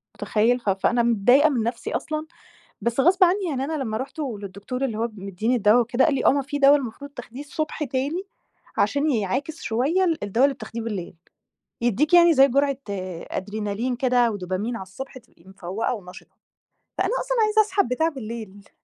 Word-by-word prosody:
مُتخيل؟ 235 +3 +1
ف 210 - -2
فأنا 235 +5 +2
متضايقة 245 +7 +4
من 240 -6 0
نفسي 235 0 -3
أصلًا، 310 0 -3 0.6
بس 235 +2 0
غصب 365 +6 +5
عني 375 +2 +2
يعني 270 -3 -2
أنا 315 - -4
لمّا 220 -3 -3
رُحت 265 +6 -6
للدكتور 210 +1 -5
اللي 225 -4 -2
هو 230 - 0
مِدّيني 200 +5 -1
الدوا 215 +2 +5
وكده 240 +3 +2
قال 305 - +2
لي: - - -1
"آه، - - +8
ما 280 -1 0
في 290 +2 -4
دوا 280 +1 +7
المفروض 280 +2 -6
تاخديه 245 0 -9
الصبح 305 +1 -3
تاني 275 +7 -2 0.6
عشان 290 +2 +2
يعاكِس 260 - -2
شوية 280 +12 +1
ال 325 - 0
الدوا 225 +6 +2
اللي 280 -1 +3
بتاخديه 230 -1 -7
بالليل، 200 -7 -5 0.7
يدّيكِ 240 - +2
يعني 345 -1 +7
زي 270 +1 +6
جرعة 275 +1 +1 0.5
أدرينالين 210 +4 -3
كده 245 -2 +2
ودوبامين 200 +4 -3
على 190 - -6
الصبح 255 +8 -9
تبقي 170 -7 -25
مفَوقة 195 +6 -3
ونَشِطة." 180 -4 -12 0.6
فأنا 380 +1 +1
أصلًا - - -2
عايزة 425 +1 +4
أسحب 400 - +1
بتاع 285 +7 +1
بالليل. 220 - -8
245 Hz, 180 wpm, -24 LUFS, 220-285 Hz, 0.7 s, آه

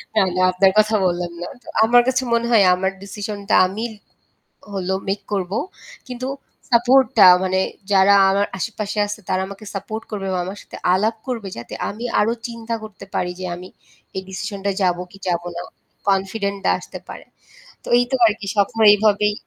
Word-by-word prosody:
না, 215 - +5
না 185 - +1
আপনার 190 +1 +4
কথা 215 +1 +3
বললাম 175 -1 -1
না। 175 - -4 0.2
তো - - -26 0.2
আমার 240 +2 +6
কাছে 260 0 +1
মনে 235 0 +1
হয় 220 -4 +6
আমার 190 +1 -1
ডিসিশন 205 +1 -6
টা - - +4
আমি 220 +5 -5 0.8
হল 190 -2 -4 0.2
মেক 195 +1 -1
করব। 190 -2 -2 0.6
কিন্তু 255 0 -5 0.4
সাপোর্ট 250 +3 +5
টা 200 - +9 0.2
মানে 190 0 +1 0.3
যারা 195 0 +6 0.2
আমার 200 +1 +2
আশে-পাশে 210 +1 -4
আছে 205 +1 -5
তারা 185 - +1
আমাকে 200 +2 -10
সাপোর্ট 220 +3 -5
করবে 200 -2 -4
বা 180 - 0
আমার 190 +3 -6
সাথে - - -11 0.2
আলাপ 215 +4 +1
করবে। 230 -6 -3
যাতে 120 - -8 0.2
আমি 220 +3 -7 0.2
আরো 220 +2 +2
চিন্তা 230 -1 -5
করতে 215 -2 -10
পারি 180 - 0
যে 185 - -4
আমি 180 +1 -10 0.5
এই 190 - -2
ডিসিশন 200 +1 -5
টায় 195 -1 0
যাব 175 -1 +2
কি 195 - -13
যাব 175 -1 0
না। 175 - -4 0.5
কনফিডেন্ট 200 +1 0
ডা - - +4
আসতে - - -9
পারে। - - -9 0.6
তো - - -13
এই 245 - +4
তো - - +3
আর 220 - +5
কি 200 - -7
স্বপ্ন 200 +2 +1 0.2
এইভাবেই 210 0 +2
200 Hz, 190 wpm, -21 LUFS, 190-225 Hz, 0.8 s, টা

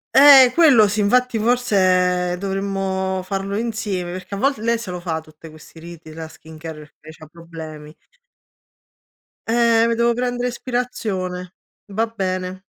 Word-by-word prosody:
Eh 270 -3 +9
quello 270 -11 +6
sì, 210 +2 -2
infatti 240 +3 +2
forse 185 -6 +1
dovremmo 190 -1 -2
farlo 195 +1 -3
insieme 215 -6 -3
perché 185 +2 -7
a - - -5
volt 275 +3 +1
lei 230 +2 0
se 225 -5 -7
lo 180 - -5
fa 165 -2 -3
tutte 155 +1 -15
questi 155 +1 -15
riti, 165 -1 -12
la 160 0 -7
skincare, 155 -1 -11
perché 155 +1 -13
c'ha 155 - -13
problemi. 160 -2 -11 1.5
Eh 230 0 +3
me 230 - 0
devo 235 0 +2
prenedere 245 0 -2
ispirazione, 215 -8 -4 0.3
va 215 +3 -1
bene. 185 -3 -4
195 Hz, 140 wpm, -20 LUFS, 175-230 Hz, 1.5 s, Eh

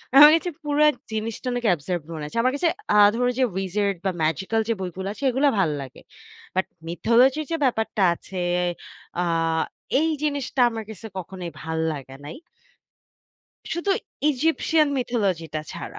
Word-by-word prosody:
আমার 295 +2 +11
কাছে 350 +2 -1
পুরা 295 0 +3 0.3
জিনিসটা 220 +3 -4
অনেক 245 -1 -3
absurd 175 +2 -3
মনে 155 -2 -5
হয়েছে। 150 +10 -7
আমার 255 +2 +2
কাছে 335 +3 +2 0.2
আ - - +3 0.2
ধরো 245 +1 +1
যে, - - +4
wizard 195 +1 0
বা - - +3
ম্যাজিক্যাল 190 +8 0
যে - - +3
বইগুলা 190 +1 -4
আছে 250 - -11
এগুলা 270 +3 +3
ভাল্লাগে। 145 -7 -2 0.6
বাট 190 - +2 0.2
mythology 240 - +3
র - - -6
যে - - +2
ব্যাপারটা 220 -4 0
আছে, 185 +2 -10 0.8
আ - - +1 0.8
এই 320 - +2
জিনিসটা 285 -3 -1
আমার 225 -1 -5
কাছে 220 +1 -9
কখনোই 180 -1 -6
ভাল্লাগে 160 -4 -3
নাই। 150 - -7 1.4
শুধু 345 +4 -1 0.4
Egyptian 310 +2 +2
mythology 205 -9 0
টা 155 - 0
ছাড়া। - - -7
220 Hz, 150 wpm, -24 LUFS, 175-265 Hz, 1.4 s, আমার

